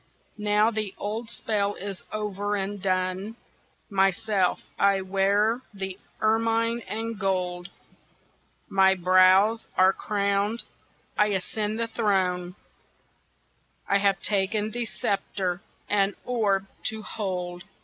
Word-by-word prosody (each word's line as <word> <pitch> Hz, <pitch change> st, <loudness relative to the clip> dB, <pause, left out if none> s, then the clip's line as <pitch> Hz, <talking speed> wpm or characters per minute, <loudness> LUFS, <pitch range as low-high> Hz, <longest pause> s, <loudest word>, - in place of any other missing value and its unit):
Now 210 Hz, +1 st, +3 dB
the 215 Hz, -3 st, -3 dB
old 220 Hz, +3 st, -3 dB
spell 205 Hz, -3 st, -1 dB
is 195 Hz, -1 st, -6 dB
over 205 Hz, -1 st, -2 dB
and 200 Hz, 0 st, -3 dB
done, 185 Hz, +2 st, -1 dB, 0.5 s
Myself 195 Hz, 0 st, +1 dB, 0.2 s
I 200 Hz, -1 st, +4 dB
wear 200 Hz, +5 st, +2 dB
the 190 Hz, -1 st, -4 dB, 0.2 s
ermine 230 Hz, +1 st, +2 dB
and 225 Hz, 0 st, -4 dB
gold, 180 Hz, -2 st, -1 dB, 1.0 s
My 190 Hz, 0 st, +4 dB
brows 185 Hz, +4 st, +5 dB
are 185 Hz, +1 st, +6 dB
crowned, 200 Hz, +2 st, 0 dB, 0.6 s
I 210 Hz, -, +5 dB
ascend 210 Hz, +2 st, -1 dB
the 230 Hz, -, +1 dB
throne, 185 Hz, -5 st, 0 dB, 1.3 s
I 200 Hz, -, +3 dB
have 195 Hz, -1 st, +2 dB
taken 210 Hz, +1 st, +1 dB
the 240 Hz, +1 st, -2 dB
sceptre 195 Hz, -3 st, -2 dB, 0.3 s
and 200 Hz, -1 st, +2 dB
orb 205 Hz, -6 st, +1 dB, 0.2 s
to 220 Hz, -1 st, -1 dB
hold. 180 Hz, -4 st, -4 dB
200 Hz, 110 wpm, -26 LUFS, 190-215 Hz, 1.3 s, are